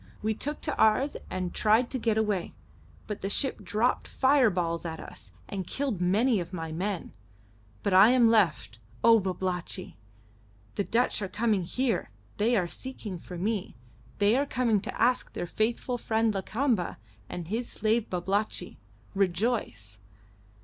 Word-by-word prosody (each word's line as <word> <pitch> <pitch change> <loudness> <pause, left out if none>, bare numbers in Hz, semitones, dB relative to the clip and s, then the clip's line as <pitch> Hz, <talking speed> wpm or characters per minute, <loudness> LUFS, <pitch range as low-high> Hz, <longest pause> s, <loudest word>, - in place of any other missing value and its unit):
We 220 +1 +1
took 295 +7 -4
to 300 - -2
ours 235 +6 +3
and 185 -1 -3
tried 220 +3 +3
to 260 - -2
get 225 -2 +1
away, 210 -5 -1 0.5
but 210 - -5
the 195 - -2
ship 265 +6 0
dropped 225 +4 0
fireballs 205 -12 +2
at 160 -2 -5
us, 95 -2 -11 0.2
and 190 -3 -5
killed 265 -10 -2
many 210 +6 +3
of 175 +1 -6
my 165 -2 -4
men. 185 +3 -3 0.7
But 200 - +1
I 195 +4 +8
am 245 -2 +5
left, 170 - +2 0.2
O 230 -1 +7
Babalatchi! 185 -1 -3 0.8
The 200 - -1
Dutch 235 +1 +1
are 200 - -1
coming 210 +1 +1
here. 250 +6 -1 0.3
They 230 +3 +3
are 180 -3 +1
seeking 210 -4 -6
for 180 +1 -9
me. 205 +2 -2 0.4
They 205 +2 +4
are 280 +2 +1
coming 235 -6 +1
to - - -6
ask 245 +2 +2
their - - -3
faithful 235 +6 -1
friend 225 -1 +1
Lakamba 215 0 -1 0.3
and 175 -2 -6
his 230 +6 -2
slave 220 +1 0
Babalatchi. 190 +1 -2 0.3
Rejoice!" 180 - -1
210 Hz, 150 wpm, -28 LUFS, 180-235 Hz, 0.8 s, I